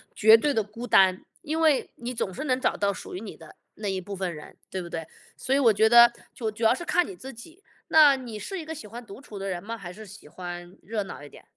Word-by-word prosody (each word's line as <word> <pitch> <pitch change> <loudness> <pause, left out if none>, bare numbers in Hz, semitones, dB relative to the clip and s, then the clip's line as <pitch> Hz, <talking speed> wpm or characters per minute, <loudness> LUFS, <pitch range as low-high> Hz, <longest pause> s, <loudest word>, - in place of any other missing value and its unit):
绝 220 +1 +7
对 290 +4 0
的 220 - +1
孤 230 +4 -8
单， 190 -3 +4 0.2
因 320 -1 -3
为， 310 -4 +2
你 245 +1 -5
总 190 -5 -3
是 300 - -5
能 255 -2 +1
找 - - +1
到 200 -1 +1
属 - - -9
于 - - -4
你 215 -2 -8
的 160 -2 -14 0.2
那 210 -2 -4
一 190 -1 -2
部 200 +2 -7
分 185 -2 -3
人， 150 - -11
对 185 - -4
不 170 - -8
对？ 165 -1 -5 0.3
所 265 - -2
以 280 - +4
我 230 -5 +5
觉 220 +2 +4
得， 235 0 +8 0.2
就 225 -4 -3
主 215 +2 -7
要 220 - +6
是 345 +6 -6
看 355 -1 +2
你 385 - -8
自 265 -5 -10
己， 330 - -14 0.2
那 300 -3 +7
你 240 -5 -7
是 385 - -5
一 - - -6
个 320 - -5
喜 220 - -9
欢 240 +3 -9
独 200 +4 -11
处 210 -7 -10
的 195 0 -4
人 175 -2 -3
吗？ 230 +2 -5
还 180 -3 -8
是 215 +3 -11
喜 200 -4 -13
欢 175 +2 -8
热 215 0 -3
闹 170 - -9
一 - - -9
点？ - - -16
220 Hz, 300 characters per minute, -26 LUFS, 190-260 Hz, 0.3 s, 得